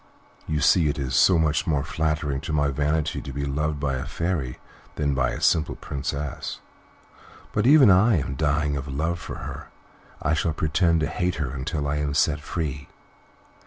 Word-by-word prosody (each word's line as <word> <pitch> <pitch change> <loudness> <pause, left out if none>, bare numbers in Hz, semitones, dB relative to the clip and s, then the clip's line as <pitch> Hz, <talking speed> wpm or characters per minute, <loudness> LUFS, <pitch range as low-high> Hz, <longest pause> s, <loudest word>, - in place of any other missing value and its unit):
You 75 -1 -1
see 85 -4 +4
it 70 - -2
is 65 -3 -3
so 90 +6 +5
much 80 -2 +1
more 75 -4 +1
flattering 75 -2 -1
to 80 - -5
my 75 -2 +2
vanity 75 +3 -1
to 70 - -7
be 70 +1 -3
loved 75 +2 -1
by 70 -2 -1
a - - -5
fairy 80 -8 -2 0.4
than 70 -1 0
by 65 -1 +1
a - - -4
simple 80 -1 +2
princess. 70 0 -4 0.9
But, 105 +3 +1
even 140 -6 +8
if - - +7
I 105 +4 +4
am 70 -4 -1
dying 75 0 0
of 70 +1 -4
love 80 +5 -2
for - - -7
her, - - -7 0.5
I 80 - 0
shall 80 0 0
pretend 80 +2 +1
to - - +2
hate 90 +3 -1
her 75 -4 -3
until 70 +2 -3
I 75 +1 -1
am 75 -1 -1
set 75 -1 +2
free." 75 -3 -4
75 Hz, 190 wpm, -24 LUFS, 70-80 Hz, 0.9 s, even